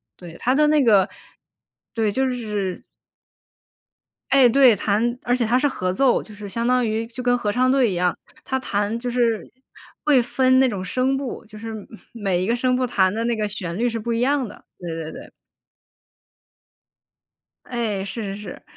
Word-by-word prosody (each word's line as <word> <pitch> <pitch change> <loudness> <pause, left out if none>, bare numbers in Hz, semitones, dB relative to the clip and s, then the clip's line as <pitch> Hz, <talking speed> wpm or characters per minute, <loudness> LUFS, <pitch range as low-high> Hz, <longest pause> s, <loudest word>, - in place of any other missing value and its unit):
对， 170 -2 -11
它 255 +2 +1
的 300 - +4
那 300 -2 +4
个 205 -5 +5 0.9
对， 220 -2 0
就 265 +5 +1
是 210 -7 -3 1.5
哎， 265 -2 +7
对， 255 -2 +6
弹 225 +5 0
而 245 - +1
且 245 -2 +1
它 235 +3 +2
是 290 +3 +2
合 185 -6 -2
奏， 255 +5 +3
就 215 - -12
是 205 -1 -8
相 230 +4 -1
当 250 -1 +3
于 220 +1 -2
就 245 +2 -7
跟 245 0 +3
合 210 - -2
唱 255 +4 +2
队 260 -4 +3
一 190 - -2
样。 180 0 +1 0.3
它 265 - -2
弹 210 -2 -1
就 245 +1 -3
是 235 -3 +1 0.6
会 285 -4 +4
分 260 +2 +3
那 265 - +5
种 200 -6 -3
声 255 +6 0
部， 270 -3 -5
就 215 -1 -12
是 225 +1 -6
每 215 -2 -8 0.5
每 - - -1
一 - - -1
个 230 - +2
声 250 +1 +1
部 255 - +1
弹 190 -5 +2
的 225 +2 -2
那 235 0 0
个 215 -1 -1
旋 180 -4 -3
律 240 +3 +1
是 230 - -3
不 235 +2 -3
一 230 - 0
样 270 +1 +1
的， 215 - -12
对 175 - -7
对 160 -1 -5
对。 280 +4 -11 2.3
哎， 225 -5 -2
是 215 +3 -4
是 195 -1 -4
是。 205 -3 -9
230 Hz, 210 characters per minute, -22 LUFS, 205-255 Hz, 2.3 s, 哎